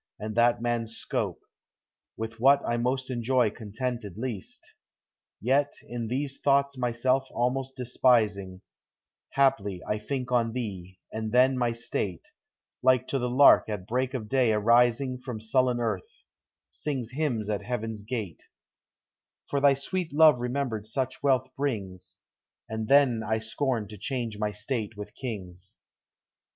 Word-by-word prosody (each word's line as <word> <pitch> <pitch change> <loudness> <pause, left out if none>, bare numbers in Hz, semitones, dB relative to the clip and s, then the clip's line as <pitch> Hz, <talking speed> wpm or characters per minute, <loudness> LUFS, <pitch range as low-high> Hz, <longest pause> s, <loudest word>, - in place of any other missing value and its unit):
and 110 +1 -4
that 120 +1 +3
man's 115 -2 -1
scope, - - -3 0.4
| - - -64
With 115 0 -5
what 140 +3 +5
I 120 - +1
most 130 +2 -1
enjoy 120 -2 +2
contented 110 -2 -5
least; 115 -5 -5
I - - -14 0.7
Yet 140 +6 +2
in 120 -1 -5
these 135 +3 -3
thoughts 140 0 +3
myself 130 +2 +1
almost 130 +2 -1
despising, 110 -7 +1 0.7
Haply 120 -9 +2
I 105 - -1
think 125 +2 -4
ou 115 -2 +2
thee, 95 -7 -5 0.2
and 110 0 -3
then 130 +2 +5
my 120 -2 +1
state 105 -6 -3 0.5
(Like 130 0 +3
to 135 - 0
the 125 0 -1
lark 130 -2 +6
at 105 -4 -4
break 130 +4 -1
of 110 -4 -4
day 125 -1 +3
arising 120 +4 +3
From 125 -3 -6
sullen 125 +2 +1
earth) 110 -6 -4 0.5
sings 130 -6 -4
hymns 125 -7 -1
at 105 -1 -1
heaven's 115 -3 -4
gate, 105 -5 -5
i - - -35 1.0
For 140 - +1
thy 140 -1 +6
sweet 175 +5 -3
love 150 -3 +6
remembered 125 -4 -2
such 130 +3 -3
wealth 130 -2 +3
I 130 - -27
brings. 100 -10 -4 0.5
That 110 0 -4
then 135 -4 +5
I 110 +1 0
scorn 110 0 -2
to 105 -2 -10
change 115 -2 -3
my 105 -1 0
state 105 0 -4
with 105 - -8
kings. 95 -7 -7
120 Hz, 150 wpm, -27 LUFS, 110-130 Hz, 1.0 s, lark